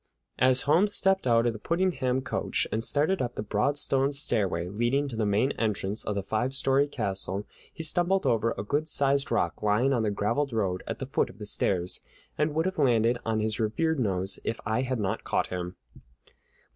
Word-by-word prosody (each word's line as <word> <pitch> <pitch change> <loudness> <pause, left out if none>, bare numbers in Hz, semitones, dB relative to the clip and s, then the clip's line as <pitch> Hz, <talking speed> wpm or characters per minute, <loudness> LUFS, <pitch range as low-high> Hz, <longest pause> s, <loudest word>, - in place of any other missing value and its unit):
As 130 0 +4
Holmes 180 +8 +3
stepped 195 -6 +2
out 115 -1 +4
of 120 - +1
the 110 - -8
Puddingham 165 - 0
coach - - -1
and 110 +1 0
started 155 +9 +1
up 120 -1 -3
the - - -3
broad 110 +8 0
stone 135 -1 +1
stairway 100 - 0
leading 120 +9 0
to 125 - -6
the 110 -2 0
main 105 +7 +2
entrance 105 -1 -1
of 105 - -3
the 100 - -2
five 115 +7 -1
story 135 +1 +2
castle, 100 -5 -2 0.3
he 165 - -6
stumbled 175 +4 +1
over 115 0 +1
a - - -3
good 145 +8 -1
sized 140 -2 +2
rock 85 - 0
lying 105 +6 +2
on 120 - +1
the 110 - +1
graveled 115 +7 -1
road 95 -5 -1
at - - -3
the 135 - -5
foot 135 - 0
of - - -14
the 105 - -7
stairs, 90 -3 0 0.3
and 150 0 0
would 160 +2 +1
have 190 -3 -2
landed 120 -3 +3
on 110 -1 +1
his 110 +1 -1
revered 150 +8 0
nose 95 -4 0
if 115 - -3
I 110 +3 0
had 130 -2 -2
not 105 +1 -2
caught - - -1
him. 90 0 -4
120 Hz, 205 wpm, -27 LUFS, 105-140 Hz, 0.3 s, As